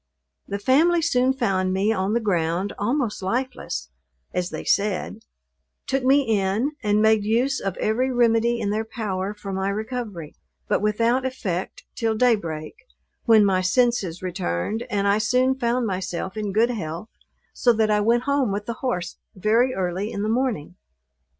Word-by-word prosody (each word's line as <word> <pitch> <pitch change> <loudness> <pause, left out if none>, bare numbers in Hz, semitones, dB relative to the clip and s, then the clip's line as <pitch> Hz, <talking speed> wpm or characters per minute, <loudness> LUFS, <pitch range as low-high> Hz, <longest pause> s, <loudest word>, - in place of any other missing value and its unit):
The 200 - -3
family 305 +11 +3
soon 260 -6 +2
found 195 -8 0
me 200 +4 +2
on 195 0 -1
the 235 - +2
ground, 180 -2 0
almost 240 0 -1
lifeless, 190 - -3 0.4
(as 180 0 -1
they - - -6
said,) 200 -2 0 0.7
took 270 -1 -1
me 275 +2 +4
in, 215 +3 0
and 210 -1 +2
made 220 -1 +4
use 240 +5 +1
of 195 -2 -3
every 245 +5 0
remedy 235 -1 +2
in 205 -3 -1
their 215 +1 0
power 210 -3 -4
for 200 -1 -7
my 190 +1 -1
recovery, 215 - -5 0.3
but - - +1
without 230 +4 +1
effect 200 -9 -4
till 225 -2 -1
day 245 +1 +4
break, 155 -6 -6 0.5
when 220 -3 +6
my 190 -2 +2
senses 190 -4 +1
returned, 180 - -2
and 200 -2 0
I 200 +1 +3
soon 250 +4 +2
found 245 -1 0
myself 185 -1 -3
in 210 -2 -3
good 225 +5 +3
health, 175 -1 -5 0.4
so 245 - +3
that 220 -1 +2
I 210 0 +3
went 235 +3 +2
home 280 -5 +1
with 205 +1 -3
the 235 - -3
horse 190 -9 -2 0.2
very 225 +6 +2
early 190 +3 -2
in 200 - -3
the 215 - -1
morning. 225 - -1
215 Hz, 165 wpm, -23 LUFS, 190-245 Hz, 0.7 s, when